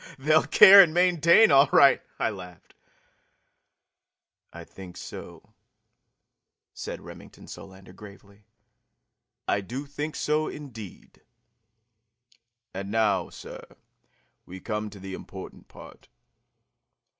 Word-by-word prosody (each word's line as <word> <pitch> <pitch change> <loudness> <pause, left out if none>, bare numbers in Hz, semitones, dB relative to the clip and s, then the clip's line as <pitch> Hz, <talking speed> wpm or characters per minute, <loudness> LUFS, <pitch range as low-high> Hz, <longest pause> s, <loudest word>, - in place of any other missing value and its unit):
"They'll 155 +3 +1
care 200 -1 +9
and 170 -4 +1
maintain, 175 +2 +4
all 140 0 +5
right!" 140 -2 +5 0.2
I - - -1
laughed. 90 -4 -13 1.8
"I 85 - -11
think 90 +1 -13
so," - - -12 1.2
said - - -8
Remington - - -14
Solander 95 -1 -13
gravely. 100 0 -16 1.0
"I 100 - 0
do 125 +8 -7
think 145 +2 -6
so, 155 +1 -1
indeed! 115 - -11 1.5
And 100 +1 -7
now, 105 -4 0
sir, - - -12 0.8
we 95 +1 -10
come 105 +2 -5
to 100 -1 -14
the 95 0 -9
important 95 0 -11
part. - - -16
110 Hz, 100 wpm, -25 LUFS, 95-150 Hz, 1.8 s, care